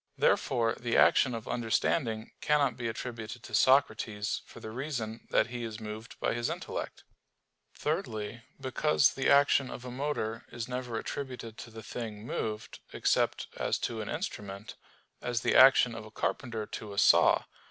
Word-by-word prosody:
Therefore 115 -1 +2
the 120 -1 0
action 125 -2 +5
of 115 0 -7
understanding 115 0 0
cannot 145 -5 +2
be 120 -1 -3
attributed 115 0 -6
to - - -11
Socrates 110 -5 +2
for - - -12
the 110 - -7
reason 120 -3 -4
that 115 - +2
he 120 -1 -3
is 110 -1 -5
moved 110 +1 -8
by - - 0
his 120 0 -1
intellect. - - -5 0.7
Thirdly, 110 +2 -3 0.2
because 135 +2 +2
the 135 - 0
action 140 -1 +5
of 125 - -8
a 125 - -6
motor 125 -4 -3
is 115 -1 -5
never 125 -2 -3
attributed 125 -4 -5
to - - -8
the 110 -1 -10
thing 110 -1 -6
moved, 110 -1 -4
except - - +1
as - - 0
to 115 -2 -3
an 105 - -5
instrument; 105 - -5 0.5
as 120 -1 -1
the - - +2
action 130 -2 +7
of 110 -1 -7
a 110 - -11
carpenter 110 0 -2
to 105 -1 -7
a - - -10
saw. - - +6
115 Hz, 165 wpm, -30 LUFS, 110-130 Hz, 0.7 s, action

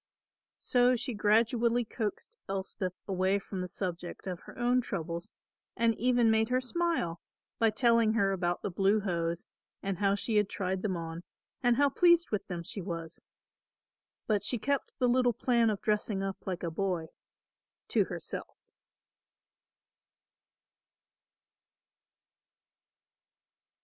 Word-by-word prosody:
So 250 0 +3
she 250 +1 -3
gradually 230 +3 +3
coaxed 215 -2 -4
Elspeth 190 -1 -3
away 190 0 +2
from 195 -1 -5
the 180 - -3
subject 175 -1 -5
of 180 -3 -4
her - - -13
own 245 +1 +3
troubles 170 -6 -4 0.5
and 230 0 +3
even 240 0 +3
made 220 +1 +2
her 255 +1 +2
smile 260 - -1 0.4
by 225 - +5
telling 230 -1 +3
her 200 -3 +2
about 175 -2 -1
the 200 - -2
blue 195 +4 +3
hose 170 -3 -2 0.4
and 195 -2 -2
how 200 -1 +3
she 215 +2 0
had 210 -1 +3
tried 190 -1 -2
them 190 -4 -1
on, 165 0 -5 0.4
and 245 -2 +4
how 285 +3 +4
pleased 345 +3 +4
with 210 - -2
them 175 -2 -4
she 195 - -5
was; 165 -2 -6 1.0
but 210 -2 +1
she 245 - +1
kept 280 +5 -1
the 250 - +2
little 245 0 +3
plan 235 0 +2
of 210 -2 -2
dressing 210 -2 0
up 195 0 -5
like 180 -2 -3
a 170 - -2
boy 175 -2 -2 0.8
to - - +3
herself. - - -6
205 Hz, 135 wpm, -31 LUFS, 185-235 Hz, 1.0 s, by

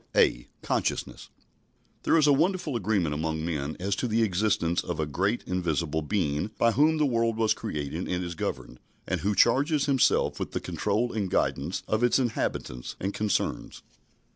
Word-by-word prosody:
(a) - - +3 0.2
(Consciousness) - - -2 0.7
There - - +3
is 155 - +4
a 145 - +6
wonderful 160 -1 +1
agreement 100 -8 0
among 80 +1 -2
men 75 -3 -3
as 100 +2 -1
to 125 - -1
the 115 0 +2
existence 95 -4 +1
of 85 -3 -4
a 80 - +1
great 95 +10 -1
invisible 85 -3 -1
Being 75 0 -1
by 115 - +4
whom 150 +7 +3
the 150 - +3
world 115 -3 +1
was 110 -1 +3
created 75 +3 -4
and 90 0 -1
is 85 -1 -4
governed, 65 -5 -5 0.3
and - - -2
who 100 +2 0
charges 140 +7 +3
Himself 135 -3 +2
with - - -4
the - - -1
control 120 +4 -1
and 100 -4 -1
guidance 75 +1 -1
of 110 +2 0
its 120 - +4
inhabitants 110 - -2
and 100 +2 -2
concerns. 105 -1 -2
100 Hz, 170 wpm, -27 LUFS, 80-120 Hz, 0.7 s, a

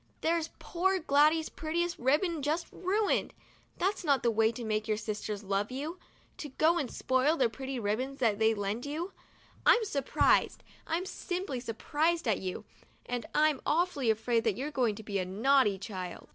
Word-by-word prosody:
There's 325 0 +1
poor 380 +2 0
Gladys's 310 0 +3
prettiest 340 +2 -2
ribbon 300 +6 +1
just 310 +4 0
ruined! 400 +3 0 0.4
That's 390 +2 0
not 280 -6 +2
the 235 - +3
way 220 0 +3
to 235 +1 -7
make 215 0 -1
your 215 -1 +1
sisters 210 -1 -4
love 200 +1 -1
you, 300 +7 -5 0.4
to 295 - -5
go 320 +5 +2
and 275 -6 -2
spoil 260 +5 +1
the 250 -3 +3
pretty 265 +2 -5
ribbons 245 +6 -2
that 225 -5 +1
they 220 0 +3
lend 205 +3 -2
you. 330 +6 -4 0.5
I'm 470 -2 +5
surprised, 280 -9 +2 0.2
I'm 340 +3 -1
simply 360 -8 -4
surprised 295 +7 -1
at 220 - +2
you, 185 -1 -5 0.4
and 245 -2 -4
I'm 305 -2 +3
awfully 310 -7 +1
afraid 225 +1 +1
that 215 -3 +1
you're 285 +4 -3
going 245 -7 +1
to 220 - -9
be 200 -2 -2
a - - 0
naughty 215 +2 +3
child 185 -3 -7
265 Hz, 175 wpm, -30 LUFS, 220-325 Hz, 0.5 s, I'm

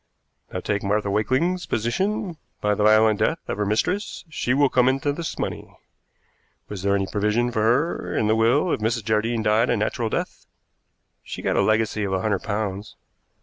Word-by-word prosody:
Now 90 - -4
take 100 +1 -1
Martha 100 0 0
Wakeling's 130 - 0
position. 180 - -1 0.2
By 105 0 +1
the 105 - -1
violent 110 0 +5
death 165 - +1
of - - -4
her 105 - 0
mistress 180 - -1
she 140 -5 -2
will 140 0 +4
come 125 -1 +3
into 135 +2 0
this 165 +2 -5
money. - - -5 0.9
Was 100 -3 -6
there 100 +1 +2
any 95 -1 0
provision 105 +4 0
for 110 - -1
her 125 +10 +1
in - - +1
the 110 +1 +3
will 120 +10 +2
if - - -1
Mrs. 110 0 -1
Jardine 110 +1 0
died 110 +3 +3
a 120 - +2
natural 110 +2 -1
death?" - - -4 0.7
"She - - -8
got - - 0
a - - +3
legacy 110 -1 +1
of 95 -1 -2
a 95 - 0
hundred 105 -3 0
pounds." 105 -1 -4
110 Hz, 190 wpm, -23 LUFS, 105-130 Hz, 0.9 s, violent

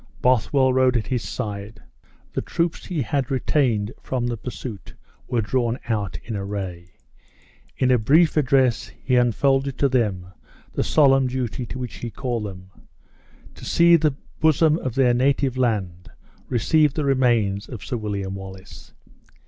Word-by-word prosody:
Bothwell 130 +2 +3
rode 130 -1 +3
at 110 - -2
his 125 +2 -1
side. 105 -3 -6 0.5
The - - -1
troops 170 -1 -2
he 165 -7 -1
had 135 +2 -1
retained 125 -5 0
from 125 -2 -2
the 120 -1 -1
pursuit 115 -3 -8 0.3
were 120 -3 0
drawn 120 +2 0
out 100 -7 -1
in 115 - -5
array. 95 -3 -5 0.8
In 130 -1 +2
a 125 - +4
brief 155 +9 +4
address 135 -5 +2
he 130 - +1
unfolded 135 +3 +2
to 140 - +3
them 105 -9 0 0.5
the - - 0
solemn 135 -3 +4
duty 125 -1 -3
to - - -6
which 125 -2 -6
he 120 - -5
had 110 - -10
called 120 -5 -2
them 95 -1 -9 0.8
to - - -14
see 170 0 +5
the 155 -4 +2 0.2
bosom 160 +1 +3
of 130 - -4
their 130 -3 +4
native 135 +1 +1
land 100 -9 -1 0.4
receive 150 +4 +2
the 150 - -1
remains 120 -7 +1
of 120 - -8
Sir - - -3
William 100 -3 -4
Wallace. 95 0 -10
125 Hz, 155 wpm, -23 LUFS, 105-135 Hz, 0.8 s, see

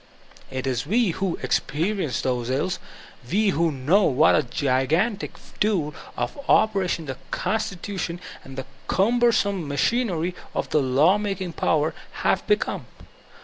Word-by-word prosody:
It 130 0 -4
is 130 0 -1
we 220 +1 +3
who 190 0 -2
experi 190 +7 0
ence 125 -7 -1
those 125 -2 -1
iUs, 150 +8 0 0.5
we 210 +2 +3
who 165 -2 +2
know 155 +9 +3
what 150 +4 +5
a - - +4
gigantic 145 - 0 0.2
tool 180 -9 +1 0.2
of - - -3
op 215 0 +5
pression 180 -4 -1
the 130 -2 -5
constitution 190 -4 -2 0.2
and 135 0 -11
the 135 - -4 0.2
cumbersome 200 -4 +2
machinery 175 - 0 0.2
of - - -1
the 150 - +3
lawmaking 180 +7 +2
power 155 0 +1 0.3
have - - +1
become. 420 - 0
170 Hz, 135 wpm, -24 LUFS, 140-200 Hz, 0.5 s, what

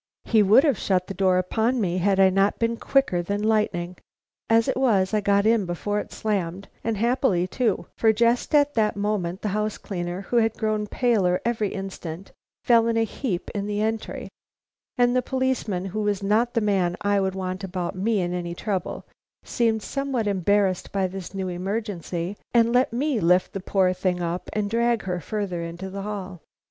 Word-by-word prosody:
He 220 -2 +4
would 210 +6 +6
have 285 -9 +2
shut 185 -2 +1
the 195 - -6
door 190 -1 +2
upon 225 +7 0
me 185 -4 0
had 195 +1 +2
I 190 -1 +6
not 195 +2 +2
been 230 0 0
quicker 250 -8 +1
than 200 +4 -2
lightning. 185 -5 0 0.5
As 225 0 +4
it - - 0
was, 215 -7 +2
I 210 - +2
got 200 0 +2
in 220 -4 +3
before 205 +4 -2
it - - -7
slammed, 195 -3 -2 0.2
and 225 -2 -1
happily 230 -5 +2
too; 215 +3 -1
for 225 - +4
just 235 +6 +1
at 290 0 +4
that 215 -4 +1
moment 200 -3 -2
the 210 - 0
house 210 +1 -1
cleaner, 175 -1 -4
who 240 +4 -1
had 225 -1 +2
grown 215 -1 -1
paler 205 -7 +2
every 225 -3 0
instant, 190 -2 -7 0.3
fell 230 -1 +4
in 230 0 +1
a 225 - +3
heap 220 -4 -3
in 200 -1 -3
the 205 0 -2
entry, 220 0 -3 0.7
and 245 0 +3
the 255 - +3
policeman, 255 -8 -1
who 205 +3 -3
was 205 -1 -1
not 225 +5 +1
the 230 - +3
man 190 -4 +1
I 205 -1 +2
would 190 -1 -1
want 185 0 -4
about 180 -2 -3
me 205 +2 +1
in 175 0 -2
any 175 -1 -4
trouble, 195 -1 -3 0.4
seemed 225 -2 0
somewhat 275 -5 -2
embarrassed 200 -1 +1
by 195 -1 0
this 185 0 -6
new 190 -1 -2
emergency, 185 -1 -3 0.2
and 235 0 +4
let 250 0 +3
me 265 +1 0
lift 180 0 +3
the 195 - -3
poor 185 -1 +1
thing 185 -1 -1
up 175 +1 -3
and 210 -1 0
drag 235 +1 +1
her 180 -2 -2
farther 195 -1 -3
into 170 +3 -6
the 195 +1 -5
hall. 195 -4 -6
205 Hz, 195 wpm, -24 LUFS, 185-225 Hz, 0.7 s, would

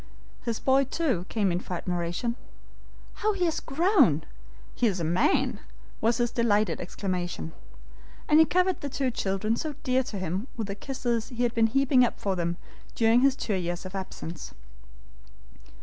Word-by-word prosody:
His 230 -2 -2
boy, 270 +1 +3
too, 260 - -1
came 205 -4 +1
in 175 - 0
for 180 - -5
admiration. 175 +6 -2 0.9
"How 430 0 +2
he 365 -3 0
has 325 - 0
grown! 295 - +3 0.5
he 240 - +2
is 190 -4 0
a - - -2
man!" 220 - +2 0.4
was 230 +1 +2
his 240 -1 +1
delighted 215 -3 +1
exclamation. 175 - -4 0.7
And 305 - +6
he 320 - +8
covered 365 0 +2
the 285 - -3
two 265 -1 -1
children 205 +1 -1
so 300 +4 -4
dear 255 0 +2
to 210 - -5
him 185 +5 -3
with 225 - -2
the 200 - -4
kisses 240 0 -2
he 245 -1 -2
had 240 -1 +1
been 225 -1 +4
heaping 265 +1 +4
up 240 - 0
for 195 -2 -1
them 170 -1 -1 0.4
during 230 +1 +4
his 270 0 +4
two 220 - -2
years 175 -1 -2
of 185 - -7
absence. 185 -3 -6
225 Hz, 170 wpm, -27 LUFS, 185-265 Hz, 0.9 s, he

